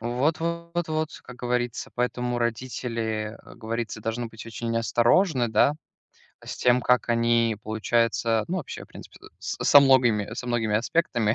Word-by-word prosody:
Вот 130 +8 0
вот 170 0 -3
вот, 155 0 -1
как 125 - -11
говорится. 125 -1 -2
Поэтому 125 0 -1
родители, 115 -2 -3
э, - - -14
говорится, 115 -1 -4
должны 115 +2 -3
быть 110 0 -11
очень 115 0 -4
осторожны, 120 - +2
да, 110 +7 +3 0.7
с - - -6
тем, 125 0 +3
как 125 0 +2
они, 115 -1 +2
получается, 115 0 +1
ну, 185 - -1
вообще, 155 - -7
в - - -24
принципе, - - -13 0.2
с - - -4
со 145 - +8
многими 120 -6 +3
со 125 - -6
многими 115 -3 0
аспектами, 115 -4 +1
120 Hz, 155 wpm, -25 LUFS, 115-130 Hz, 0.7 s, со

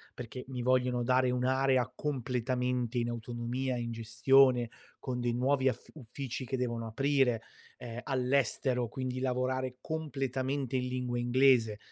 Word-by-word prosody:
perché 125 +1 -7
mi 130 -2 -4
vogliono 125 -1 +2
dare 130 +1 +3
un'area 130 0 +2
completamente 125 -2 -1
in 120 0 0
autonomia, 120 +2 -3
in 120 -1 -3
gestione, 120 +2 +4 0.3
con 125 -2 -3
dei 120 -1 0
nuovi 130 +2 +2
aff - - -6
uffici 130 -1 -6
che 130 - -2
devono 120 -2 -2
aprire, 135 -1 +2 0.4
ehm, 120 0 -7
all'estero, 130 -2 +1
quindi 130 +1 -4
lavorare 130 0 -1
completamente 135 -3 -2
in 125 0 -1
lingua 125 -1 -2
inglese, 120 -3 +4
125 Hz, 130 wpm, -31 LUFS, 120-130 Hz, 0.4 s, gestione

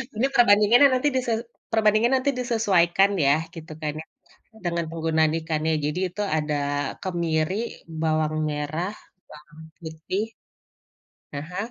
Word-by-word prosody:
Ini 240 +5 +1
perbandingannya 230 +4 +6
nanti 255 +3 +1
dise 250 -2 0 0.4
perbandingannya 220 +3 +3
nanti 280 +1 +1
disesuaikan 200 -6 +3 0.2
ya 140 - +5 0.2
gitu 160 -1 -10
kan 150 -1 -2
ya - - -12 0.6
dengan 170 -1 -1
penggunaan 160 -1 +1
ikannya. 160 0 -1
Jadi 150 +4 -2
itu 200 +4 -6 0.2
ada 150 -1 -1 0.5
kemiri, 170 -1 -1 0.5
bawang 155 -1 0
merah, 155 +6 -3 0.4
bawang 150 +1 -14 0.2
putih 160 +5 -4 1.1
aha, 160 +6 -6
170 Hz, 120 wpm, -24 LUFS, 155-210 Hz, 1.1 s, perbandingannya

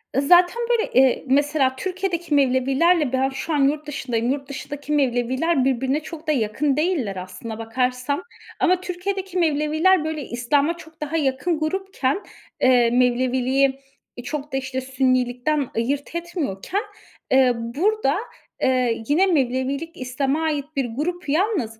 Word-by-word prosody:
Zaten 350 - +5
böyle, 470 -2 +1
eee, 260 0 +4
mesela 280 0 +2
Türkiye'deki 360 0 -3
Mevlevilerle 275 +3 +3
ben 265 +1 +2
şu 270 +4 -4
an 295 - +1
yurtdışındayım. 275 -6 -2
Yurtdışındaki 285 +1 -5
Mevleviler 260 +2 +1
birbirine 265 +2 +1
çok 315 0 -10
da - - +3
yakın 265 +3 0
değiller 305 - 0
aslına 185 +5 -7
bakarsan. 250 +6 -1 0.4
Ama 365 0 +3
Türkiye'deki 375 0 -4
Mevleviler 315 +2 +3
böyle 315 -2 -3
İslam'a 280 +7 +1
çok 320 -2 -15
daha 300 +2 -2
yakın 295 +3 0
grupken, 370 -2 -1 0.4
eee, 245 -2 +5
Mevleviliği 255 +2 +2 0.4
çok 295 +1 -5
da, - - +1
işte, 260 0 -3
Sünnilikten 255 +1 0
ayırt 275 +7 -2
etmiyorken, 340 - -3 0.5
eee, 260 -1 +5
burada 280 - 0 0.5
eee, 250 -3 +1
yine 330 +7 +4
Mevlevilik 275 0 -1
İslam'a 270 +4 -1
ait 300 -3 -1
bir 275 -2 0
grup. 300 +8 -4
Yalnız 305 - 0
280 Hz, 125 wpm, -22 LUFS, 255-320 Hz, 0.5 s, Zaten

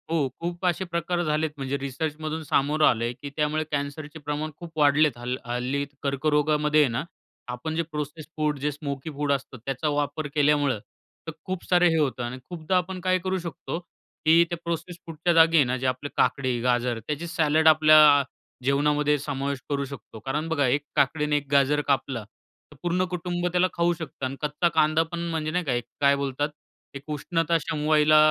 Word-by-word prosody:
हो. 160 -4 +1
खूप 175 +2 -4
असे 180 +1 +1
प्रकार 175 0 -1
झालेत 155 0 0
म्हणजे 135 0 -2
रिसर्चमधून 155 +3 -4
सामोरं 150 +1 +2
आलंय 120 0 +1
की 145 - -5
त्यामुळे 155 +1 +1
कॅन्सरचे 145 +2 -4
प्रमाण 150 +1 -3
खूप 170 -1 -9
वाढलेत. 145 -2 +4
हल्ल 125 +1 -3
हल्ली 125 +4 -2 0.2
कर्करोगामध्ये 150 +2 +2
आहे 145 - +3
ना 115 - -2 0.5
आपण 140 +6 -4
जे 170 - +1
प्रोसेस्ड 150 +1 -5
फूड 150 -2 0
जे 150 +2 0
स्मोकी 140 0 -5
फूड 145 0 -1
असतं 135 -2 -2
त्याचा 135 +3 -1
वापर 145 +1 -1
केल्यामुळं 145 -4 +3 0.5
तर - - -2
खूप 185 -1 -4
सारं 180 -1 +5
हे 165 - +1
होतं 135 -5 0
आणि 120 +2 -4
खूपदा 175 +1 -1
आपण 185 +1 -2
काय 185 0 +2
करू 185 +1 -1
शकतो 170 -1 -5 0.5
की 165 +2 +7
त्या 170 - -3
प्रोसेस्ड 170 +1 -4
फूडच्या 165 +1 0
जागी 165 0 +6
आहे 150 - +7
ना 125 +1 -1
आपले 130 +3 -4
काकडी, 130 -3 +1
गाजर 120 -1 +1
त्याचे 150 +7 -4
सॅलड 160 -2 +2
आपल्या 155 -2 +7 0.4
जेवणामध्ये 145 +2 +2
समावेश 140 -1 -3
करू 140 -1 -1
शकतो. 130 -5 -10
कारण 145 +7 -3
बघा, 145 -4 +2
एक 140 +4 +2
काकडी 150 +2 +2
आणि 150 0 +1
एक 145 -1 -5
गाजर 140 +1 +3
कापला 135 -4 0 0.5
तर - - -18
पूर्ण 180 +1 +1
कुटुंब 175 0 -2
त्याला 180 +1 +3
खाऊ 170 0 +2
शकतं 160 -5 -6
आणि 130 +1 -3
कच्चा 150 +3 +1
कांदा 155 0 +4
पण 175 - -4
म्हणजे 155 -1 -2
नाही 180 +2 0
का, 125 -4 +1 0.2
काय 140 0 +5
बोलतात 140 +1 -2 0.5
एक 140 - -7
उष्णता 165 +2 0
शमवायला 155 0 +3
150 Hz, 180 wpm, -25 LUFS, 140-160 Hz, 0.5 s, की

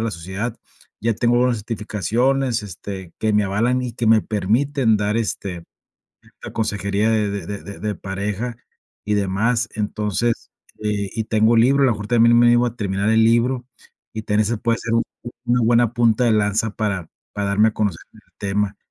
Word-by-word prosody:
la 115 - -1
sociedad. 95 +7 -5 0.4
Ya 115 +1 +1
tengo 120 +2 +2
unas 125 -1 +2
certificaciones, 115 +3 -1
este, 95 -2 -8
que 110 -1 0
me 105 0 +3
avalan 115 +6 +1
y 125 -2 -4
que 120 - -2
me 110 0 +6
permiten 110 +3 +1
dar, 105 +1 0
este, 95 -6 -3 0.8
la - - -8
consejería 100 -1 0
de 110 -2 +1
de 100 0 -5
de 100 - -9
de 105 0 -2
pareja 100 +5 -4 0.5
y 105 - -1
demás. 105 +4 +1
Entonces, 105 +2 -2 0.3
eh, 105 -2 -1
y 110 -2 -2
tengo 110 +1 +3
libro, 135 +4 +4
a - - +6
lo - - +3
mejor 105 -2 -4
también 120 0 +5
me 120 - +5
animo 120 +1 +5
a 120 0 -4
terminar 100 0 -1
el 110 0 +4
libro, 120 +2 +2 0.5
y 110 - -2
también 105 0 +1
se 115 +3 0
puede 115 +1 +1
hacer 115 - -3
un 115 - +3 0.4
una 120 0 +2
buena 115 0 +3
punta 120 0 +3
de 120 - +3
lanza 105 +1 +1
para, 100 -6 -2 0.2
para 100 -1 -2
darme 105 +2 +4
a 110 - -1
conocer 105 -6 -1
este - - -21 0.2
tema. 100 0 -1
110 Hz, 185 wpm, -21 LUFS, 100-120 Hz, 0.8 s, me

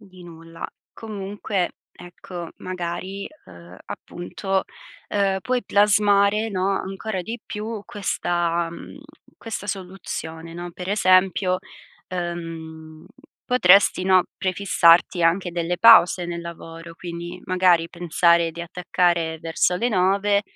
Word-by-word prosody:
Di 185 -3 -16
nulla. 165 -1 -11 0.3
Comunque, 200 -3 -4 0.2
ecco 175 -1 -9
magari, 185 +2 -5 0.2
uhm, 85 +1 -14
appunto, 190 +2 -4 0.5
uhm, 195 -2 +1
puoi 250 +2 -1
plasmare, 205 +1 +3
no, 190 -1 0
ancora 195 +1 -4
di 230 +5 -6
più 215 0 -5
questa, 175 -4 -1
mhmm, 170 - -11 0.4
questa 225 -3 -6
soluzione, 180 -4 -6
no? 175 +1 -6
Per 180 +1 -7
esempio, 185 -2 +3 0.5
uhm, 165 -3 -6 0.4
potresti, 195 -6 +5
no, 185 -1 +4
prefissarti 180 -2 +3
anche 175 +2 +2
delle 170 +1 -2
pause 185 -5 +7
nel 170 0 -4
lavoro, 165 0 -9
quindi 175 +1 -7
magari 180 -2 +3
pensare 170 -1 +2
di 170 - -8
attaccare 170 -1 0
verso 165 +2 +1
le 235 +7 0
9:00, 200 0 +2
180 Hz, 110 wpm, -23 LUFS, 170-195 Hz, 0.5 s, pause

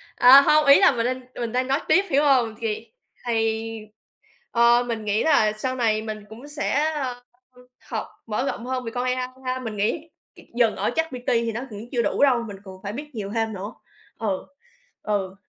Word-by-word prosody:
à, 265 +3 +9
hông, 300 +1 +4
ý 280 +4 +8
là 385 -5 +6
mình 235 -3 -1
đang 255 +1 -1
mình 235 -2 -3
đang 255 +1 0
nói 275 +3 +1
tiếp, 385 - +4
hiểu 285 +1 +3
hông? 250 -6 +3
Thì 225 0 -4 0.4
thì 225 -1 -1 0.6
ờ, 235 +1 +4
mình 225 -2 -3
nghĩ 210 +1 0
là 250 -9 +4
sau 255 +4 -3
này 220 -3 +1
mình 215 -1 -6
cũng 240 +7 -11
sẽ, 295 +1 0
ờ, 255 -4 -4 0.7
học - - -3 0.2
mở 225 +4 -1
rộng 240 - -4
hơn 255 -1 -3
về 230 - -4
con 245 0 -1
AI 255 0 0 0.3
ha, 255 0 -1
mình 220 -4 -5
nghĩ 295 +11 -1 0.3
c - - -22 0.2
dừng 235 -3 +2
ở - - 0
ChatGPT 260 -7 -2
thì 230 -1 +1
nó 230 - -4
cũng 215 +3 -9
chưa 240 -2 +1
đủ - - -1
đâu, 255 -4 +4
mình 205 -3 -7
còn 190 -1 -12
phải 200 0 -5
biết 295 +5 -7
nhiều 205 -3 -5
thêm 225 -1 0
nữa, 200 +3 -6 0.5
ừ, 200 -4 -2 0.6
ừ. 195 -3 -2
235 Hz, 205 wpm, -24 LUFS, 215-260 Hz, 0.7 s, à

